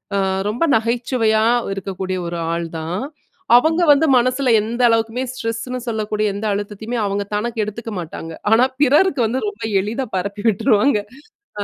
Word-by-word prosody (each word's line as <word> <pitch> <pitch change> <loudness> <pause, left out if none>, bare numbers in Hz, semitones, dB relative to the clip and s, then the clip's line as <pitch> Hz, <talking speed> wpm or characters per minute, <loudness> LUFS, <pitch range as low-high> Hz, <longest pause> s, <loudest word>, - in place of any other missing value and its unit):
அ - - +2 0.3
ரொம்ப 230 +8 -1
நகைச்சுவையா 230 -1 +1 0.3
இருக்கக்கூடிய 190 -1 -4
ஒரு 170 0 -4 0.2
ஆள்தான். 165 +2 -4 0.6
அவங்க 320 +6 +2
வந்து 285 +3 +2
மனசுல 255 +2 +1
எந்த 230 +3 -3
அளவுக்குமே 230 +2 0
ஸ்ட்ரெஸ்னு 250 +1 -4
சொல்லக்கூடிய 215 -1 -1
எந்த 205 +2 -5
அழுத்தத்தையுமே 205 +4 -4
அவங்க 200 0 -1
தனக்கு 225 +1 -2
எடுத்துக்க 225 +2 -6
மாட்டாங்க. 165 -1 -7 0.2
ஆனா 225 +2 +6 0.2
பிறருக்கு 295 +1 +4
வந்து 250 +4 -1
ரொம்ப 415 0 -7 0.2
எளிதா 230 +7 -3
பரப்பி 200 +3 -4
விட்ருவாங்க. 215 +3 +2 0.6
அ. - - -1
225 Hz, 140 wpm, -19 LUFS, 200-250 Hz, 0.6 s, ஆனா